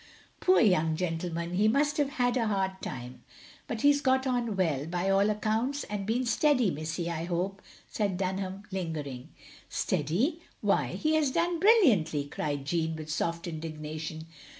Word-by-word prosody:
"Poor 370 +1 +4
young 165 -7 +3
gentleman, 170 0 -3
he 205 +4 +3
must 290 +6 +2
have 285 -1 0
had 245 -1 +2
a 235 -3 +1
hard 190 -2 -1
time, 125 0 -7 0.5
but 225 -2 -4
he 290 0 +6
's 285 - -1
got 260 -1 +2
on 245 -4 0
well, 155 -6 0
by 175 +3 0
all 200 +2 +4
accounts 220 +7 0
and 205 -1 -4
been 245 +3 +1
steady, 250 - +3
missy, 160 +3 -3
I 165 -1 -3
hope," 185 +3 -2 0.3
said 200 -4 -1
Dtmham 190 +1 -3
lingering. 155 -9 -4 0.4
"Steady! 270 - 0 0.2
Why - - +1
he 310 0 0
has 310 -3 +3
done 340 +5 0
brilliantly!" 230 - +4
cried 145 -1 -3
Jeanne, 160 +1 0
with 155 -1 -6
soft 170 +1 -1
indignation. 155 -1 -6
190 Hz, 160 wpm, -29 LUFS, 160-245 Hz, 0.5 s, he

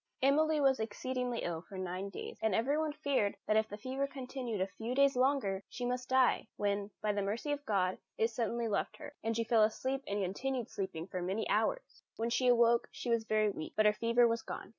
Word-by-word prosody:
Emily 305 +3 +4
was 270 -3 +4
exceedingly 245 +2 -2
ill 165 -2 -2
for 190 +2 -11
nine 185 +1 -3
days, 195 - -7
and 220 -3 +2
everyone 295 +7 +1
feared 275 -8 0
that 215 - +2
if 220 0 +2
the 205 - -6
fever 260 +5 -2
continued 255 -5 -5
a 190 - +2
few 225 +6 -5
days 275 0 +4
longer 250 -7 +1
she 245 - -4
must 250 +1 -2
die; 260 -3 +3
when, 200 0 -1
by 210 -1 +2
the 205 - 0
mercy 215 +9 -2
of 290 0 -2
God, 185 -3 +1 0.2
it 225 +1 +2
suddenly 235 +1 -1
left 205 -2 -1
her, 295 -1 -9
and 225 0 0
she 230 - +1
fell 230 -1 +3
asleep 260 +5 +1
and 200 +1 -1
continued 245 +6 -2
sleeping 190 -4 -4
for 185 -1 -5
many 190 +5 -1
hours. - - 0
When 230 +1 -2
she 250 +1 +2
awoke, 235 -1 +5
she 240 - -4
was 230 -1 +2
very 215 -1 +2
weak, 155 -5 -7
but 215 - +3
her 210 - +6
fever 235 +2 +3
was 230 0 0
gone. - - -7
230 Hz, 220 wpm, -33 LUFS, 205-260 Hz, 0.2 s, her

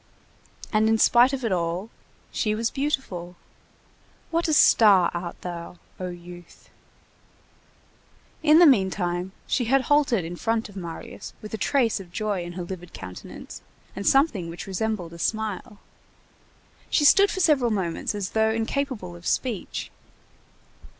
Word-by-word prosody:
And 215 +1 +3
in 225 - +3
spite 240 +3 +5
of 265 -3 -3
it 225 - 0
all, 175 +4 -2 0.4
she 215 -2 0
was 225 +1 -1
beautiful. 265 - -3 1.0
What 335 +1 +1
a 315 - +1
star 205 - +6
art 175 0 -5
thou, 175 0 -7 0.2
O 185 - -3
youth! 175 0 -12 1.7
In 310 -1 +6
the 350 - +8
meantime, 190 - +2
she 245 - 0
had 270 +4 +3
halted 265 - +2
in 175 +1 -6
front 225 +2 -1
of 200 - -15
Marius 170 -4 -8
with 215 - -10
a - - -1
trace 240 -5 +1
of 180 -3 -11
joy 210 -2 -2
in 175 0 -7
her 180 0 -5
livid 175 -1 -8
countenance, 90 -1 -9 0.3
and 200 - -4
something 265 - +3
which 170 - -7
resembled 195 -3 -3
a 170 - -11
smile. 215 0 -3 1.1
She 295 - +2
stood 400 +7 +7
for - - -3
several 290 -9 +3
moments 190 -1 -2
as 200 -2 -3
though 220 0 +2
incapable 225 -4 -2
of 175 0 -9
speech. 240 -7 -2
210 Hz, 145 wpm, -25 LUFS, 175-245 Hz, 1.7 s, the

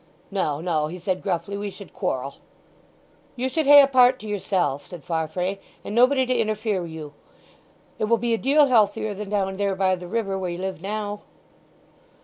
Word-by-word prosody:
"No, 155 -7 -1
no," 160 -3 0
he 175 +4 -7
said 185 +1 -2
gruffly; 200 +4 -2
"we 205 0 -4
should 200 0 -12
quarrel." 130 +2 -3 1.0
"You 255 +1 -2
should 310 +2 -1
hae 285 0 +10
a - - +4
part 255 -1 +5
to 215 - -8
yourself," 185 -9 -1
said 175 -4 -10
Farfrae; 180 +3 -2 0.3
"and - - -5
nobody 255 +3 +4
to 255 - 0
interfere 215 -3 0
wi' 170 - -5
you. 155 -2 -8 0.9
It - - +1
will 230 +2 +3
be 235 +1 -1
a - - +2
deal 290 +3 +4
healthier 215 -4 +2
than 205 0 -7
down 195 -2 -1
there 200 -1 0
by 190 -1 +2
the 180 -1 -5
river 195 -1 -2
where 185 -1 -3
you 175 - -4
live 190 -3 -5
now." 205 +1 -4
200 Hz, 190 wpm, -24 LUFS, 180-230 Hz, 1.0 s, hae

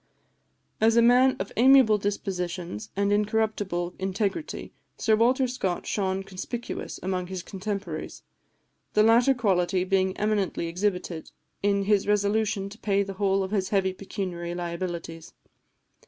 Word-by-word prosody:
As 225 +1 +4
a - - +7
man 250 +2 +5
of 195 - -4
amiable 250 -3 +6
dispositions 180 - -3
and 200 +1 +1
incorruptible 205 -4 0
integrity, 200 - -3 0.2
Sir 220 - +3
Walter 255 +4 +3
Scott 195 -8 -2
shone 195 -1 -1
conspicuous 195 +5 -6
among 180 -1 -2
his 185 -1 -5
contemporaries, 200 +1 -5 0.7
the 210 - +6
latter 240 +4 +5
quality 185 -5 +1
being 190 0 +1
eminently 210 -5 0
exhibited 180 -1 -2 0.3
in 200 0 +2
his 205 0 +2
resolution 210 0 +1
to 210 +2 -13
pay 200 -1 +1
the 195 0 -6
whole 195 -1 +2
of 190 - -5
his 190 -3 0
heavy 190 -2 +1
pecuniary 180 -3 -5
liabilities. 170 -2 -5
195 Hz, 130 wpm, -26 LUFS, 185-215 Hz, 0.7 s, a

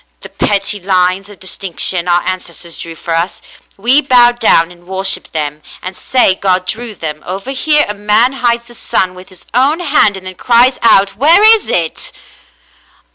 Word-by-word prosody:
The - - -10
petty 205 0 -1
lines 185 +1 0
of 205 - -14
distinction 185 -1 -3
our 175 0 +2
ancestors 175 -2 -6
drew 165 -1 -7
for 165 +1 -5
us, 170 +3 -2 0.2
— - - -34
we 270 +4 +5
bow 245 -4 +4
down 220 -8 +2
and 175 0 -19
worship 190 +1 -2
them, 150 -1 -4 0.2
and 185 +1 -8
say 250 -4 +2
God 185 -1 -1
drew 225 +2 -4
them. 155 -3 -6
Over 195 +8 -6
here 300 +2 +2
a 210 - -4
man 210 +5 +2
hides 235 -2 -1
the 240 - -16
sun 185 -5 -1
with 185 0 -14
his 185 -2 -13
own 275 +7 +2
hand 280 - +3
and 190 - -12
then 185 - -5
cries 245 +6 +2
out, 200 -4 +4
'Where 325 - +5
is 440 -1 +5
it. 165 -2 -2
195 Hz, 185 wpm, -13 LUFS, 180-240 Hz, 0.2 s, we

